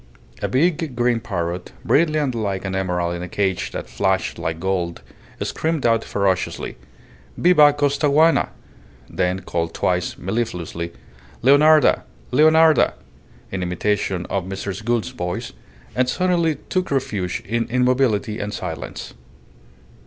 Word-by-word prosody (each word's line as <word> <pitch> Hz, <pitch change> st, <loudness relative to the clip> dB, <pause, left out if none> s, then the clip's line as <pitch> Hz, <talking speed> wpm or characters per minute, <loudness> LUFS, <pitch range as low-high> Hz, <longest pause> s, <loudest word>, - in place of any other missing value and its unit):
A -, -, 0 dB
big 155 Hz, 0 st, +1 dB
green 120 Hz, -1 st, +2 dB
parrot, 90 Hz, -5 st, -4 dB
brilliant 150 Hz, -4 st, +2 dB
like 100 Hz, -4 st, -2 dB
an 95 Hz, -, -3 dB
emerald 90 Hz, -2 st, -1 dB
in 85 Hz, -, -5 dB
a 90 Hz, -, -6 dB
cage 95 Hz, -1 st, -1 dB
that -, -, -5 dB
flashed -, -, -1 dB
like 80 Hz, 0 st, -3 dB
gold, 90 Hz, -2 st, -2 dB, 0.4 s
screamed 160 Hz, -4 st, -2 dB
out 115 Hz, -1 st, +3 dB
ferociously, 95 Hz, -2 st, -1 dB, 0.6 s
"Viva 155 Hz, -5 st, +6 dB
Costaguana!" 145 Hz, +2 st, +3 dB, 0.6 s
then 90 Hz, +1 st, -1 dB
called 85 Hz, -2 st, -3 dB
twice 90 Hz, -1 st, 0 dB
mellifluously, 90 Hz, -5 st, -3 dB, 0.5 s
"Leonarda! 150 Hz, +4 st, +6 dB, 0.3 s
Leonarda!" 155 Hz, +1 st, +5 dB, 0.6 s
in 95 Hz, -, -3 dB
imitation 90 Hz, 0 st, -1 dB
of 95 Hz, -3 st, -2 dB
Mrs. 95 Hz, +1 st, -5 dB
Gould's 120 Hz, +1 st, 0 dB
voice, 90 Hz, -8 st, -4 dB, 0.4 s
and 125 Hz, 0 st, +2 dB
suddenly 170 Hz, +1 st, +1 dB
took 185 Hz, 0 st, -1 dB
refuge 100 Hz, -10 st, -2 dB
in 115 Hz, +2 st, -1 dB
immobility 125 Hz, -3 st, +1 dB
and 105 Hz, -, -3 dB
silence. 80 Hz, -5 st, -6 dB
115 Hz, 120 wpm, -21 LUFS, 90-145 Hz, 0.6 s, Viva